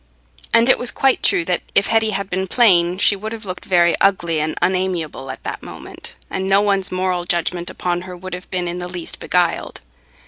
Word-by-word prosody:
And 230 +1 +4
it 260 - +5
was 245 - 0
quite 270 -1 +2
true 170 - +3
that 180 0 0
if 200 - +4
Hetty 225 -1 +2
had 200 -2 -2
been 190 0 -2
plain, 180 -6 +4
she 205 +1 +4
would 215 +2 -6
have 225 -1 -8
looked 185 -1 -6
very 175 -2 +4
ugly 170 -5 +2
and 155 +1 -2
unamiable 180 -7 -1
at 130 - -8
that - - -5
moment, - - -10
and 190 0 -3
no 195 +1 +5
one's 200 -2 +1
moral 185 -1 -1
judgment 175 0 -2
upon 175 -1 -2
her 180 0 -9
would 185 +1 -8
have 180 +1 -7
been 180 -1 -2
in 175 +1 -4
the 180 - -5
least 175 -2 -5
beguiled. 175 -2 0
185 Hz, 210 wpm, -19 LUFS, 175-195 Hz, -, it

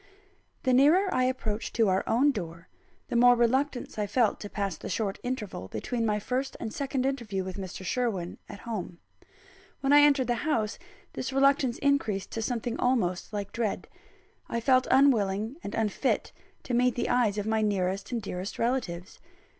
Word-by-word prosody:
XI. 395 0 -31 0.2
The 255 - +2
nearer 325 +9 +5
I 255 - +2
approached 230 -4 -2
to 225 -3 +3
our 190 0 +2
own 270 +6 +4
door, 170 -6 -7 0.4
the - - -3
more 245 +1 +7
reluctance 250 +1 0
I 205 - 0
felt 225 +1 +1
to 205 - -7
pass 200 -2 -2
the - - -8
short 205 -3 -2
interval 215 - -4
between 225 - -2
my 210 -1 +1
first 255 +6 -3
and 220 - -5
second 270 -2 -2
interview 235 -8 -2
with 185 0 -6
Mr. 190 -1 -7
Sherwin, 195 -6 -2
at 200 - -9
home. 200 -7 -5 0.8
When 275 +1 +3
I 290 - +9
entered 285 -3 +4
the 240 -1 -1
house, 220 -7 0 0.3
this 255 - -4
reluctance 270 -2 +3
increased 225 -9 0
to 225 - -3
something 235 +1 -2
almost 205 -10 0
like 205 -2 -4
dread. 230 -3 -2 0.6
I 235 - -1
felt 255 +2 +3
unwilling 225 -3 +3
and 200 - -5
unfit 225 +4 0 0.3
to 250 - -4
meet 250 +1 +3
the 240 - -1
eyes 235 -4 +2
of 205 - -2
my 220 0 +1
nearest 195 -1 -1
and 240 - -1
dearest 190 -2 -5
relatives. 225 -7 -2
235 Hz, 180 wpm, -28 LUFS, 200-260 Hz, 0.8 s, I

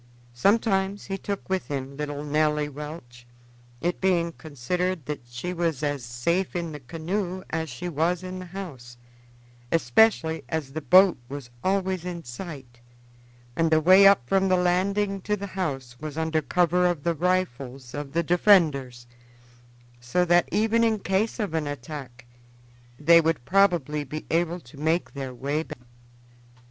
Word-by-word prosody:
Sometimes 195 - +1
he 195 - -3
took 200 0 -5
with 190 -1 -1
him 140 -1 -4
little 145 0 -4
Nelly 150 0 +1
Welch; 145 -5 -9 0.5
it 175 +1 -1
being 175 -3 +2
considered 165 +3 -3
that 150 -1 -4
she 125 +10 -5
was 165 -5 -1
as 145 -3 -1
safe 145 +12 -1
in 170 -2 -2
the 150 - -7
canoe 175 +7 -4
as 160 0 -2
she 125 +8 -6
was 170 +2 0
in 185 0 -6
the 185 - -8
house, 145 -11 -8 0.7
especially 160 - +3
as 150 -4 -3
the 155 - -4
boat 185 +1 +6
was 135 -3 -7
always 190 -2 0
in 175 -2 -5
sight, 125 -2 -9 0.8
and 165 +2 +2
the 160 0 +4
way 185 +5 +7
up 195 -12 +4
from 195 +4 +2
the 185 - +4
landing 195 +3 +1
to 210 +2 -1
the 200 - -5
house 135 -10 -3
was 155 0 -6
under 160 -1 0
cover 180 +3 +2
of 170 -5 -2
the 170 - +1
rifles 140 -8 -2
of 145 -1 -6
the 170 +1 +1
defenders; 155 - +3 0.9
so 120 +9 0
that, 175 0 +3
even 225 +2 +2
in 225 -1 +2
case 195 +2 -1
of 205 -6 -2
an 160 -2 -1
attack, 135 -3 -7 0.7
they 170 +3 +6
would 160 -6 -1
probably 175 -7 +2
be 150 +3 -7
able 170 +1 +1
to 140 -2 -15
make 160 +3 0
their 135 -2 -5
way 140 +5 -2
back. - - -8
165 Hz, 155 wpm, -26 LUFS, 140-185 Hz, 0.9 s, way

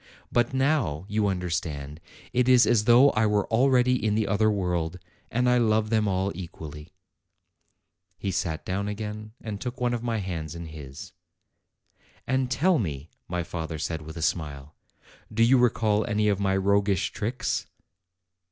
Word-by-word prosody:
But 120 -1 +2
now, 130 - 0
you 105 0 +1
understand, 80 -5 -3 0.3
it 125 0 +2
is 125 -1 +7
as 110 -3 +3
though 125 +4 +7
I 110 0 +2
were 105 -1 +1
al 130 +4 +4
ready 125 -2 +3
in 105 -1 +1
the 110 0 +1
other 105 +2 +2
world, 90 -4 -1 0.3
and 125 +2 +1
I 125 0 +4
love 110 -1 +2
them 110 -2 +2
all 95 0 0
equally." 80 -3 -9 1.2
He 100 - -3
sat 80 -2 -2
down 100 +2 -2
again, 105 +1 -5
and 105 -3 -6
took 125 -1 -5
one 120 -1 +1
of 120 - -2
my 115 -1 -1
hands 85 -6 -4
in 85 0 -6
his. 75 -4 -9 1.1
"And 130 -1 0
tell 165 +7 +2
me," 75 - -4 0.2
my 90 0 -2
father 80 -1 -5
said, 80 +1 -3
with 80 +2 -9
a 80 - -3
smile, 75 -4 -2 0.6
"do 115 +1 +2
you 125 +2 +5
recall 110 -3 +2
any 105 -1 +1
of 100 -1 +1
my 95 -1 +1
roguish 100 0 +1
tricks?' 110 -2 -2
105 Hz, 165 wpm, -26 LUFS, 85-115 Hz, 1.2 s, is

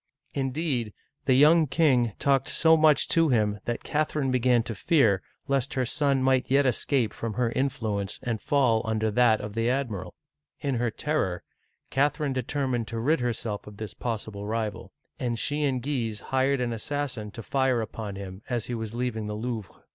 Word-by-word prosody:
Indeed, 135 -5 -1 0.3
the 130 - +4
young 155 +4 +6
king 130 -6 +3
talked 135 -1 +2
so 160 0 +5
much 155 -3 +4
to 165 -1 +4
him 105 -4 +1
that 120 - -3
Cath 150 0 -1
erine 135 -4 +1
began 125 -2 +3
to 115 - -5
fear 110 - +3 0.3
lest 140 +1 0
her 130 -1 +1
son 140 +1 +1
might 130 -1 +2
yet 140 +1 +4
escape 125 -2 +1
from 115 -3 -4
her 120 -1 +1
influence 110 -7 -2
and 115 -4 -2
fall 130 -7 +2
under 110 -1 0
that 115 -1 +4
of 105 0 -6
the 115 +2 0
admiral. 110 -9 -2 0.4
In 140 -2 -1
her 120 0 +1
terror, 110 - -1 0.5
Catherine 145 0 +1
determined 130 -2 -1
to 115 - -4
rid 150 +7 +2
her 120 -1 0
self 105 -3 -5
of 105 -1 -11
this 110 -1 -6
possible 105 -3 -4
rival, 110 -1 -3 0.3
and 120 -2 -1
she 145 +4 -1
and 130 -3 -1
Guise 120 -7 -2
hired 135 +2 +1
an 120 -1 -1
assassin 125 -2 -3
to 115 - -7
fire 130 -2 +1
upon 110 -2 -5
him 95 0 -8
as 120 -3 -1
he 125 - -4
was 110 -1 -4
leaving 120 -3 -2
the 105 - -3
Louvre. 110 -2 -5
125 Hz, 185 wpm, -27 LUFS, 110-140 Hz, 0.5 s, young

